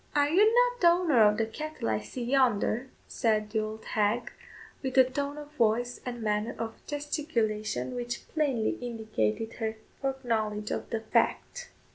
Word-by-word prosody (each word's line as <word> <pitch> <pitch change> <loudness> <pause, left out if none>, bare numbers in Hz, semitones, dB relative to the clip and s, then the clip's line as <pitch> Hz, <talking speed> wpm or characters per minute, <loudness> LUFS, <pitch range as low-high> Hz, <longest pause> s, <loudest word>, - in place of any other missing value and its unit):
"Are 290 0 +4
you 410 +7 +5
not - - +3
the 345 - +7
owner 340 -8 +4
of 210 0 +5
the 225 - +1
cattle 310 - -5
I 110 -1 +1
see 240 - -6
yonder?" 245 -1 +2 0.2
said 215 -3 0
the 220 - +1
old 215 0 -5
hag, 215 +3 0 0.5
with 265 -1 -3
a 260 - +10
tone 280 +3 -3
of 295 0 -9
voice 245 -2 +1
and 240 -2 -4
manner 210 +1 0
of 225 0 -6
gesticulation 225 - -2
which 240 -1 -4
plainly 275 -8 0
indicated 220 - -2
her 220 -1 -2 0.3
foreknowledge 225 -6 -1
of - - -3
the 225 -2 -2
fact. 485 - 0
240 Hz, 160 wpm, -29 LUFS, 215-285 Hz, 0.5 s, a